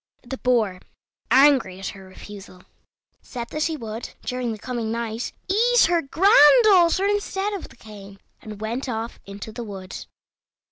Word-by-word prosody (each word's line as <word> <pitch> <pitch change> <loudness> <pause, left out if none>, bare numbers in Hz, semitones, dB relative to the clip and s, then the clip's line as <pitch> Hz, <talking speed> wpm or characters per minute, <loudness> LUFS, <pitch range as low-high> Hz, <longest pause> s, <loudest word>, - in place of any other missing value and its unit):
The 265 +1 -7
Boar, 220 -7 +1 0.5
angry 265 -9 +4
at 195 - -5
her 195 -1 -11
refusal, 190 -1 -13 0.6
said 240 -2 -7
that 305 +1 -2
he 320 -2 -2
would, 225 -2 -7
during 250 -2 -3
the 220 - -5
coming 230 0 -4
night, 230 0 -4 0.2
eat 470 +5 +3
her 345 0 +3
granddaughter 370 - +5
instead 410 0 -1
of 395 - -6
the - - -18
cane, 200 -3 -13 0.2
and 210 -1 -10
went 235 +5 -4
off 230 0 -5
into 200 +2 -8
the 240 +2 -7
wood. 195 -4 -9
240 Hz, 150 wpm, -23 LUFS, 215-325 Hz, 0.6 s, granddaughter